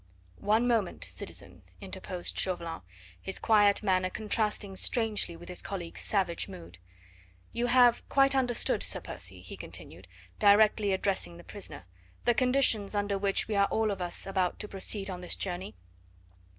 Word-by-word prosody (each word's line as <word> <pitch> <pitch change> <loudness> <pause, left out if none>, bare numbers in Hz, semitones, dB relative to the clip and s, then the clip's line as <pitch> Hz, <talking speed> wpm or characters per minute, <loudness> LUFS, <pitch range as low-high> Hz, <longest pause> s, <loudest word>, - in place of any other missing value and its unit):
"One 220 +4 +2
moment, 225 -7 0
citizen," 90 0 -7 0.2
interposed 185 -2 -4
Chauvelin, 170 -3 -1 0.4
his 190 - -4
quiet 205 -2 +4
manner 185 -2 +2
contrasting 210 -1 -1
strangely 215 -4 0
with 175 +1 -12
his 180 - -5
colleague's 175 -4 -6
savage 185 -5 0
mood. 85 +1 -11 0.7
"You 240 +1 0
have 245 -1 +4
quite 275 0 +4
understood, 250 -3 +1
Sir - - -2
Percy," - - -7
he - - -8
continued, - - -6 0.3
directly 210 0 +5
addressing 190 - 0
the - - -12
prisoner, - - -8 0.4
"the 240 - +5
conditions 240 -4 +2
under 205 -1 0
which 195 0 0
we 220 - -2
are 200 0 +4
all 220 -1 +1
of 195 - -4
us 175 -1 -3
about 190 -2 0
to 210 - -5
proceed 195 0 -2
on 180 -2 -5
this 180 - 0
journey?" 185 0 -4
200 Hz, 150 wpm, -30 LUFS, 180-220 Hz, 0.7 s, directly